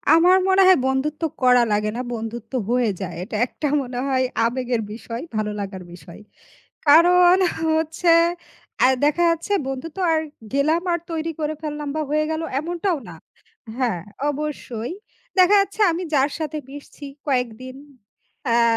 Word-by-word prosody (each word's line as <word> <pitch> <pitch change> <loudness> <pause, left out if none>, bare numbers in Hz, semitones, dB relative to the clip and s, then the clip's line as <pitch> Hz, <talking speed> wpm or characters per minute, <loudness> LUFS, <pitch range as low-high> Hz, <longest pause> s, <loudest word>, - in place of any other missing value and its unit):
আমার 360 +3 +6
মনে 380 0 +4
হয় 375 - +7
বন্ধুত্ব 285 +4 -1 0.2
করা 250 -1 +6
লাগে 210 +1 +1
না, - - -2
বন্ধুত্ব 225 +2 -6 0.2
হয়ে 245 -3 +2
যায়। 180 -2 -5
এটা 215 +2 -7
একটা 295 +3 -4
মনে 245 -1 -5
হয় 260 -1 +1 0.2
আবেগের 245 -1 -1
বিষয়, 230 +2 -7
ভালো 215 -1 -1
লাগার 190 -2 -6
বিষয়। 175 +3 -13 0.7
কারণ 350 +4 +7 0.4
হচ্ছে 320 +2 +2 0.7
আ - - +8 0.2
দেখা 325 +4 +2
যাচ্ছে 335 +5 -4
বন্ধু 270 +4 -4
তো - - -2
আর 315 - +2 0.3
গেলাম 310 +5 +2
আর 340 - 0
তৈরি 325 0 -2
করে 305 0 -1
ফেললাম 295 -1 -4
বা 310 - -1
হয়ে 305 +1 +1
গেল 315 +1 -2 0.2
এমনটাও 345 +2 -1
না। 165 - -10 0.6
হ্যাঁ, 235 -10 -1 0.3
অবশ্যই। 285 -4 -4 0.5
দেখা 370 +3 +6
যাচ্ছে 400 +2 -1
আমি 350 +3 -3
যার 280 +1 +3
সাথে 310 -1 -3
মিশছি 285 +1 -11 0.2
কয়েকদিন, 255 -1 -2 0.7
অ্যা 235 0 +3
285 Hz, 150 wpm, -22 LUFS, 240-330 Hz, 0.7 s, আ